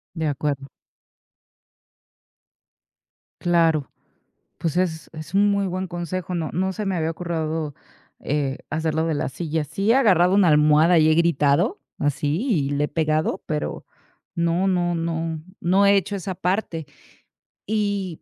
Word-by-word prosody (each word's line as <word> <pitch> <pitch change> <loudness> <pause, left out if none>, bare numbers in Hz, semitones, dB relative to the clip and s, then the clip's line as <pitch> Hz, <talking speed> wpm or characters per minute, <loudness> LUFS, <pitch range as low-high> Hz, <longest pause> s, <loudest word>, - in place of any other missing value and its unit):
De 160 -2 -1
acuerdo. 140 -1 -2 2.7
Claro. 165 -4 +2 0.7
Pues, 165 0 -2
es 160 -4 -1
es 155 +2 -9
un 205 +1 +4
muy 200 -1 +1
buen 185 +1 -3
consejo. 175 +1 -4
No 160 -2 -2
no 190 +3 0
se 210 +2 -4
me 195 - -1
había 160 -1 0
ocurrido, 160 -3 -3 0.5
eh, 140 -2 -2
hacer 160 0 -1
lo 160 +1 +1
de 165 - 0
la 145 0 -1
silla. 160 +3 -2
Sí, 195 +9 0
he - - +5
agarrado 190 -8 +4
una 200 -3 +5
almohada 155 +2 +5
y 155 - +5
he 155 - +4
gritado 150 -4 +2 0.2
así 145 - -1
y 155 - +1
le 145 +1 +1
he - - -6
pegado, 155 0 0
pero, 150 -1 -3 0.5
no 170 +3 +1
no 175 -2 +1
no, 165 -1 -2 0.2
no 190 +3 +3
he 200 - +6
hecho 200 +1 0
esa 185 0 -5
parte 180 -4 -2 0.8
y 205 -5 -2
165 Hz, 150 wpm, -23 LUFS, 155-185 Hz, 2.7 s, he